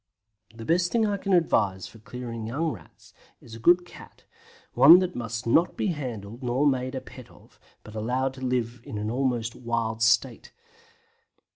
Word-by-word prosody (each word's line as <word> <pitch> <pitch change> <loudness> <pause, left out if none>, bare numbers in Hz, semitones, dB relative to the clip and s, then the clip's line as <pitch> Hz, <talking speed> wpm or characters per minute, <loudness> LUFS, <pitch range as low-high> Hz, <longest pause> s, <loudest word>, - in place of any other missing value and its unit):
The 115 -1 -9
best 175 +4 +1
thing 230 -2 +2
I 205 -1 0
can 195 0 -4
advise 100 - +2
for 115 - -13
clearing 115 -1 -7
young 155 +7 -1
Rats - - -14 0.3
is 115 - -15
a 115 - -8
good 175 +8 +4
cat, - - -15 0.5
one 140 +8 +9
that 180 -1 -1
must 115 0 -5
not 160 +9 +2
be 205 - 0
handled 120 - -6
nor 125 +3 0
made 130 -1 0
a 130 - -4
pet - - -13
of, - - -21 0.2
but 110 - -12
allowed 125 +5 -1
to 130 - -12
live 120 -2 -2
in 105 +1 -4
almost 120 -3 -1
a - - -15
wild 115 -2 -2
state. 115 +2 +1
125 Hz, 175 wpm, -26 LUFS, 115-145 Hz, 0.5 s, one